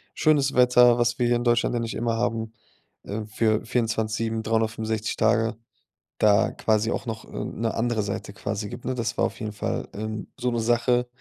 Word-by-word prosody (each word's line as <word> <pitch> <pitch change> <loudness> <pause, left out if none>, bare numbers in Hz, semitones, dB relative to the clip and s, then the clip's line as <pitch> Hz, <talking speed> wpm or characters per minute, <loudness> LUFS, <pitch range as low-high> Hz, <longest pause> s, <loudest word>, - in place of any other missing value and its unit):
Schönes 145 -3 +3
Wetter, 125 -1 +6
was 120 0 +1
wir 120 - +2
hier 120 0 +3
in 120 - -3
Deutschland 120 0 +2
ja 120 - +1
nicht 115 - -3
immer 115 -1 -1
haben, 115 -1 -1 0.5
ähm 105 +2 -4
für 110 0 +1
24/7, 115 -1 -1
365 110 -1 -1
Tage, 115 0 +2 0.6
da 105 0 +4
quasi 110 +1 +1
auch - - -3
noch 110 -1 -4
'ne 115 0 -3
andere 115 -1 0
Seite 100 0 -5
quasi 100 +1 -4
gibt, - - -9
ne? 130 - -1
Das 115 -1 -2
war - - +3
auf - - -5
jeden 110 -2 -4
Fall, 105 - -3
ähm, 110 +1 -5
so 125 0 0
'ne 120 - -1
Sache, 120 +1 +2
115 Hz, 185 wpm, -25 LUFS, 110-120 Hz, 0.6 s, Wetter